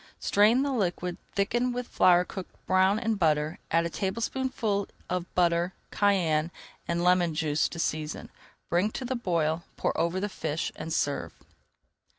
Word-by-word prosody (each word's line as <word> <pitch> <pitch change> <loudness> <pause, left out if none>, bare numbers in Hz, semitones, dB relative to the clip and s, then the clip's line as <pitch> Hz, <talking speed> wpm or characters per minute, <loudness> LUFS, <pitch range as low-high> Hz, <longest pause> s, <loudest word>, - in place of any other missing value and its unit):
Strain 220 +6 +4
the 285 - 0
liquid, 180 -6 -1 0.2
thicken 240 +5 +1
with 245 0 -4
flour 180 0 +4
cooked 190 -1 -8
brown 190 +2 +4
in 225 0 0
butter, 155 -5 +1
add 165 0 +2
a - - -1
tablespoonful 220 0 -1 0.2
of 180 -1 -3
butter, 175 0 +2 0.2
cayenne, 170 -6 +2 0.4
and 170 0 0
lemon 180 -2 +3
juice 150 -1 +1
to - - -8
season. 155 -1 -3 0.4
Bring 180 +5 +2
to 260 - -4
the 260 +1 -2
boil, 170 -7 0 0.2
pour - - 0
over 170 +3 0
the 205 - -1
fish, 160 -5 -3
and 165 - -6
serve. 145 -2 -1
180 Hz, 155 wpm, -28 LUFS, 165-205 Hz, 0.4 s, Strain